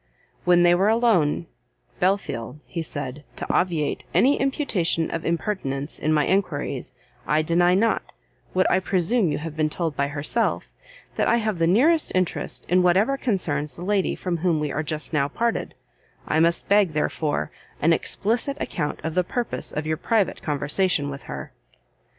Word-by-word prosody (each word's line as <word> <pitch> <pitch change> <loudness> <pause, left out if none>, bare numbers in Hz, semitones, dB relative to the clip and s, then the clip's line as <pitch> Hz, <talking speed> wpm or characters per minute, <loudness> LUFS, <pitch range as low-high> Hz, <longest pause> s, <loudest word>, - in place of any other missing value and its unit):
When 175 -1 +5
they 175 0 +6
were 190 +3 +3
alone, 220 -10 +2 0.5
"Belfield," 165 - -1
he 170 - -4
said, 145 -2 -5
"to - - -5
obviate 165 -5 0
any 275 +3 +4
imputation 215 - 0
of 165 - -3
impertinence 160 -5 -2
in 155 - 0
my 150 -1 +3
enquiries, 145 -9 -1 0.3
I 155 +1 +2
deny 175 +3 +3
not, 225 +3 +1 0.4
what 185 0 +3
I - - +4
presume 190 +1 +1
you - - -1
have 155 0 -6
been 155 -1 +1
told 160 -1 -2
by 140 - 0
herself, 150 +11 -1 0.5
that - - +2
I 235 - +4
have 215 -5 -1
the 165 - +3
nearest 295 - +3
interest 185 -2 -1
in 180 +2 +4
whatever 190 +9 +3
concerns 160 - -1
the 175 - -7
lady 200 -1 +1
from 180 -2 -2
whom 165 -1 +1
we 150 -1 -2
are 155 - -1
just 155 +1 -3
now 140 -2 +2
parted: 230 +10 -2 0.5
I 155 - +2
must 170 +1 +2
beg, 200 -5 +4
therefore, 150 0 -1 0.3
an 165 +3 +4
explicit 230 - -1
account 150 - -3
of 160 - -3
the 180 +1 +2
purpose 240 +6 -2
of 150 +1 -3
your 155 0 -1
private 220 -1 0
conversation 145 +1 0
with 140 0 -7
her." - - -6
170 Hz, 170 wpm, -24 LUFS, 150-200 Hz, 0.5 s, they